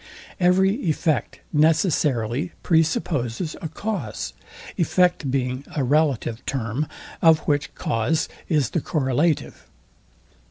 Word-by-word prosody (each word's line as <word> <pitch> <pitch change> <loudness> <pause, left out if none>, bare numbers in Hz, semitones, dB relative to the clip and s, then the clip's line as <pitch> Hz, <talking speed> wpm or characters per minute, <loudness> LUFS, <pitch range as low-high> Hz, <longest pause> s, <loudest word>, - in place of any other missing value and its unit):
Every 185 +2 +4 0.2
effect 155 -5 0
necessarily 150 - +2
pre 165 -2 +4
supposes 155 -2 -2
a 165 - -3
cause; 155 - -4 0.4
effect 175 -4 +2
being 130 0 -1
a 145 - +1
relative 135 -4 +1
term, 130 +3 -2 0.3
of 160 -1 +6
which 145 -1 -1
cause 115 +8 0 0.2
is 150 -8 +2
the 170 - 0
correlative. 150 +2 0
150 Hz, 105 wpm, -23 LUFS, 130-165 Hz, 0.4 s, of